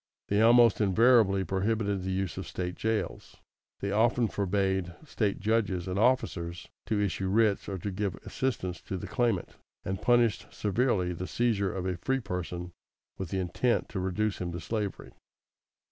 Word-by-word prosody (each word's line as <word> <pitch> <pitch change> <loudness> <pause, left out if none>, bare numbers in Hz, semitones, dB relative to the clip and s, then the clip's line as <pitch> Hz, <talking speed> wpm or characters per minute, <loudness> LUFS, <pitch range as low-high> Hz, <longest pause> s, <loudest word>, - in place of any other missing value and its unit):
They 100 +1 +3
almost 115 -1 +6
invariably 105 -1 +4
prohibited 100 +1 0
the 95 - -4
use 95 -3 -2
of - - -6
State 90 -1 -3
jails, 110 +3 -3 0.4
they 100 - -1
often 115 +3 +3
forbade 95 -3 -1
State 105 -8 -1
judges 100 -4 0
and 95 +1 -1
officers 90 -8 0 0.2
to 105 - +1
issue 95 -1 -1
writs 105 0 +2
or 95 - -3
to 100 +3 -4
give 100 -1 -2
assistance 95 -10 -2
to 95 - -5
the - - -6
claimant, 115 -8 -1 0.3
and 95 0 -3
punished 120 -3 +2
severely 100 -4 0
the 90 +2 -5
seizure 105 -5 +1
of 95 -1 -4
a 90 -2 -1
free 135 +9 0
person 90 -4 -5 0.5
with 95 -3 -4
the 95 - -2
intent 95 +7 0
to 95 - -4
reduce 95 +3 -1
him 90 -1 -2
to 85 - -4
slavery. 105 +1 -4
100 Hz, 160 wpm, -29 LUFS, 90-110 Hz, 0.5 s, almost